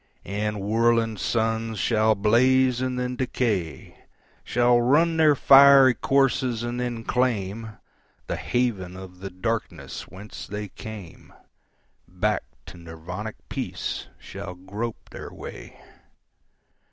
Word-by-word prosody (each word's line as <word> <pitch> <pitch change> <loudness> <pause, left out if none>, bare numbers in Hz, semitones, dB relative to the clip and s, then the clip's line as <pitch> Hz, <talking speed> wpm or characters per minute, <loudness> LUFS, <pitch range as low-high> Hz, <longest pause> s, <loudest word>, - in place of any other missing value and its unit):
And 105 +2 -2
whirling 115 +2 +2
suns 110 +1 -1
shall 110 -1 +2
blaze 125 +4 +3
and 130 -1 -2
then 125 0 -2
decay, 110 - -2 0.4
Shall 120 0 +3
run 160 +7 +3
their 155 -2 +5
fiery 135 -1 +8
courses 130 -3 +1
and 120 +1 -3
then 120 -2 -3
claimThe 110 -3 -2 0.6
haven 100 -8 -2
of 90 -1 -11
the 95 +1 -6
darkness 115 +5 -4
whence 100 +3 -10
they 105 0 -5
came; 105 -4 -10 0.8
Back 105 +4 -1 0.2
to - - -11
Nirvanic 85 +6 -7
peace - - -4
shall 90 - -8
grope 105 +6 -6
their - - -8
way. - - -10
115 Hz, 110 wpm, -25 LUFS, 100-125 Hz, 0.8 s, fiery